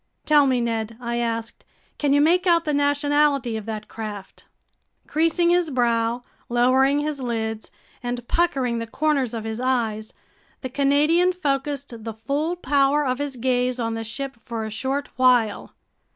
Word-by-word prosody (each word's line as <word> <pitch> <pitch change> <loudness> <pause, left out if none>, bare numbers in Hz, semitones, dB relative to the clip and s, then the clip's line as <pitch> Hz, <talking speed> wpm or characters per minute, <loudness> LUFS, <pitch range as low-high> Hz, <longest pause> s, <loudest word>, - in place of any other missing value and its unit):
"Tell 295 -2 +5
me, 255 -2 +2
Ned," 225 -1 -2
I 235 -1 -3
asked, 230 -1 -3 0.4
"can 290 -2 +1
you 285 +1 +4
make 355 +5 +3
out 335 -1 +4
the 300 - 0
nationality 285 -3 +2
of 220 -1 -6
that 215 -1 -5
craft?" 210 -3 -8 0.6
Creasing 330 +2 +2
his 350 -2 +2
brow, 235 -2 0 0.3
lowering 260 +4 +3
his 295 -1 -3
lids, 225 -3 -3 0.3
and 245 -1 -4
puckering 265 -9 +1
the 230 - -5
corners 275 -2 0
of 225 - -4
his 220 +1 -4
eyes, 230 -4 -1 0.5
the 260 - -4
Canadian 295 +7 +3
focused 280 -7 -3
the 225 0 -5
full 290 +9 -2
power 285 -2 +2
of 255 0 -1
his 285 -2 -3
gaze 250 0 0
on 230 -1 -1
the 225 0 -4
ship 265 +4 -5
for 225 -2 -4
a 220 - -6
short 270 +6 -2
while. 250 -5 +2
255 Hz, 160 wpm, -23 LUFS, 230-290 Hz, 0.6 s, Tell